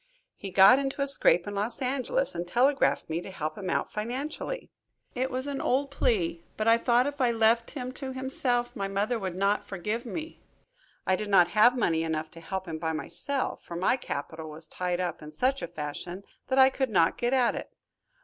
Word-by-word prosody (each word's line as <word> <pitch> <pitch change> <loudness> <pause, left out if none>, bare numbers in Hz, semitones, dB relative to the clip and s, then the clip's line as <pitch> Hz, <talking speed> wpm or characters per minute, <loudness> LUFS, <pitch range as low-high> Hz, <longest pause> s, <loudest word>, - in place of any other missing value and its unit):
He 195 - -7
got 195 +7 +7
into 275 0 -1
a - - +1
scrape 275 -10 +4
in 205 - -5
Los 210 +4 -1
Angeles, 275 - -1
and 175 - -4
telegraphed 265 +9 +2
me 165 +2 -2
to - - -9
help 155 -4 -4
him 190 -2 -5
out - - -1
financially. 270 - -4 0.4
It 260 +1 -1
was 260 0 -3
an 280 -1 -3
old 275 +2 +1
plea, 175 -11 0
but 215 - -1
I 230 +1 +6
thought 240 +1 +3
if 285 0 -3
I 250 - +4
left 230 0 +3
him 250 -1 -4
to 265 0 -6
himself 260 -2 -1
my 195 - -2
mother 205 +4 -1
would 190 -3 -4
not 200 +2 +1
forgive 210 +5 -3
me. 320 +6 -6 0.6
I 190 - +3
did 210 +2 -4
not 180 -3 +5
have 220 +6 +5
money 165 -8 +1
enough 160 -1 -2
to 165 - -12
help 190 +2 -5
him 160 -1 -5
by 160 0 -1
myself, 175 - -3
for 170 - -8
my 185 +8 +2
capital 160 - -5
was 155 +1 -3
tied 180 +1 -2
up 180 -1 -3
in 150 - -9
such 260 - 0
a - - -3
fashion 170 +4 -6 0.2
that 260 - 0
I 265 0 +7
could 265 -1 -1
not 170 -6 +3
get 240 0 +1
at 255 -2 +3
it. - - -6
215 Hz, 210 wpm, -28 LUFS, 175-260 Hz, 0.6 s, got